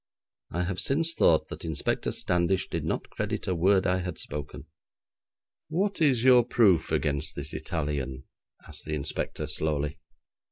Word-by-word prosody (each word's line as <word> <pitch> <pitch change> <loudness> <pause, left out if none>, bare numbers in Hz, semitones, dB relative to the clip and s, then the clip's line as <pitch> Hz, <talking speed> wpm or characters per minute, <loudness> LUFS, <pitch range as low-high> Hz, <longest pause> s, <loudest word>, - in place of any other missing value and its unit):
I 90 +2 -1
have 90 0 -2
since 165 +4 +1
thought 80 - +3
that - - -8
Inspector 80 -3 -1
Standish 90 +2 +1
did - - -2
not - - -3
credit - - -3
a 95 - +1
word 95 +3 +3
I 90 0 +2
had 90 -3 -4
spoken. 75 +1 -6 1.0
'What 190 +4 -1
is 130 -7 +3
your 125 -2 +7
proof 110 -7 +3
against 75 +1 0
this 70 +1 -4
Italian?' 70 -5 -3 0.4
asked - - -8
the 75 - -2
Inspector 70 - -3
slowly. 75 -1 -1
85 Hz, 150 wpm, -28 LUFS, 75-115 Hz, 1.0 s, your